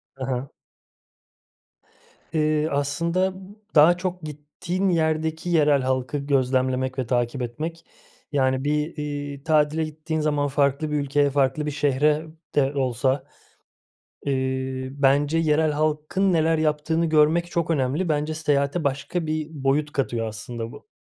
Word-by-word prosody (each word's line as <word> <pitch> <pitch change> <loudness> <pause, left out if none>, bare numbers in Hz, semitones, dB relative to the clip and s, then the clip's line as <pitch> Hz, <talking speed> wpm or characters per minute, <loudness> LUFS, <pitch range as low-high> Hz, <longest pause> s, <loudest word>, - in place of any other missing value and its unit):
Ha 135 - -6
ha. 130 +1 -3 1.8
Eee, 155 -1 +2
aslında 170 +7 0 0.4
daha 160 +4 +7
çok 180 -1 -3
gittiğim 155 +6 -3
yerdeki 160 0 0
yerel 150 -4 +4
halkı 130 +2 -1
gözlemlemek 130 -1 0
ve 130 - 0
takip 120 +1 0
etmek. 155 +8 -5 0.5
Yani 130 -2 +1
bir, 150 +3 -1
iii, 145 -1 -5
tatile 155 0 +2
gittiğin 155 +1 -4
zaman 145 -1 +1
farklı 140 +2 +1
bir - - 0
ülkeye, 145 0 +2
farklı 140 +1 +1
bir 150 - -2
şehire 150 +2 +1 0.3
de 140 -1 +2
olsa, 130 0 0 1.0
eee, 130 -1 -2
bence 140 +3 +2
yerel 155 -1 +2
halkın 155 +5 0
neler 160 0 +3
yaptığını 155 +2 +1
görmek 160 +2 +3
çok 170 -1 -1
önemli. 150 +4 0
Bence 150 +1 0
seyahate 150 0 0
başka 140 +5 -2
bir 155 -1 -2
boyut 145 +1 0
katıyor 120 -5 -1
aslında 115 +2 -6
bu. - - -13
150 Hz, 130 wpm, -24 LUFS, 135-155 Hz, 1.8 s, daha